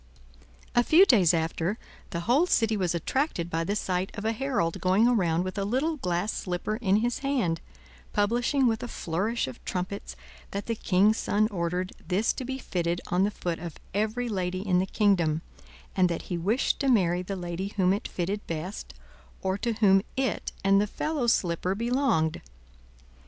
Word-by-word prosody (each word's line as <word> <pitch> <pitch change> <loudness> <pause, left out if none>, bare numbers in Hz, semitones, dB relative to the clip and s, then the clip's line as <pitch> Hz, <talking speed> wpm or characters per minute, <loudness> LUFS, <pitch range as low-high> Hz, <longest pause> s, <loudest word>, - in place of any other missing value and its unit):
A 240 - +4
few 335 +9 +7
days 200 - +5
after, 165 +4 -1 0.3
the 170 - -3
whole 260 - +3
city 225 -9 +2
was 180 -4 0
attracted 175 - -1
by 165 +1 0
the 200 +5 -1
sight 185 -2 -1
of 205 - -5
a 225 - +2
herald 230 -9 -1
going 190 +5 +4
round 170 -4 +1
with 185 +2 -4
a - - 0
little 265 +10 0
glass 180 -2 -1
slipper 180 +4 -3
in 200 -5 +2
his 235 +3 +1
hand, 245 - 0 0.5
publishing 240 +6 +2
with 225 -2 +1
a - - -4
flourish 195 - -2
of 130 - -9
trumpets, 185 +2 -4 0.3
that 200 0 -4
the 230 - -1
king's 210 0 +3
son 215 +1 +1
ordered 180 0 -2
this 200 +5 +1
to - - -5
be 265 +1 -4
fitted 175 -8 -2
on 180 +2 +3
the - - +1
foot 175 -5 -4
of 170 -2 -7 0.2
every 220 +4 0
lady 185 -2 -2
in 180 -2 +3
the 190 - 0
kingdom, 175 -7 +2 0.5
and 185 -2 +4
that 170 - -3
he - - +1
wished 200 +9 0
to 275 - +1
marry 180 -7 +3
the 195 +2 -4
lady 175 +1 -4
whom 185 -1 +4
it 200 - -3
fitted 195 +4 -2
best, 170 +5 -5 0.5
or 190 0 +1
to 235 +3 -1
whom 200 -3 +4 0.2
it 265 -1 -1
and 195 +1 +5
the 210 - 0
fellow 295 +3 -2
slipper 180 -3 +1
belonged. 235 - +1
195 Hz, 180 wpm, -27 LUFS, 175-230 Hz, 0.5 s, few